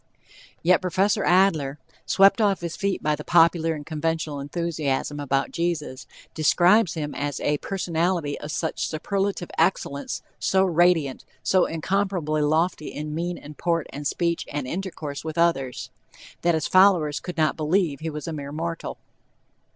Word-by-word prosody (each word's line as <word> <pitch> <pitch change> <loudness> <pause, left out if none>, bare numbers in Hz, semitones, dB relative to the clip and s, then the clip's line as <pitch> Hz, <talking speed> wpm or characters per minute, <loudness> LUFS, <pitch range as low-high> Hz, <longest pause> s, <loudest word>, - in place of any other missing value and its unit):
Yet 175 +1 +4
Prof. 185 +3 +2
Adler, 175 -8 +3 0.3
swept 195 +3 +5
off 200 -3 +2
his 170 -1 -4
feet 200 -1 -2
by 150 0 +2
the 150 - -8
popular 165 -1 +3
and 145 -1 -8
conventional 160 -1 -2
enthusiasm 145 -2 -2
about 135 -1 0
Jesus, 165 -6 -3 0.3
describes 175 +5 +4
him 150 -2 -3
as 145 -1 -3
"a 145 0 0
personality 170 -4 -1
of 150 - -6
such 160 +1 -2
superlative 195 +3 -2
excellence, 140 -6 0 0.2
so 190 0 +2
radiant, 170 -6 +2 0.2
so 185 -1 +3
incomparably 165 -2 -1
lofty 155 +1 +1
in 150 0 -5
mien 175 +2 -2
and 150 0 -12
port 165 -3 0
and 145 +1 -3
speech 170 +2 -1
and 145 -2 -3
intercourse 155 -2 -5
with 160 0 -5
others," 135 -7 0 0.5
that 170 -1 +2
his 155 - -1
followers 185 -6 +4
could 180 -1 -7
not 155 -1 +2
believe 155 -1 0
he 160 +1 -4
was 150 +1 -6
a 165 - -3
mere 140 -2 -6
mortal. 165 +2 -4
165 Hz, 150 wpm, -24 LUFS, 150-180 Hz, 0.5 s, swept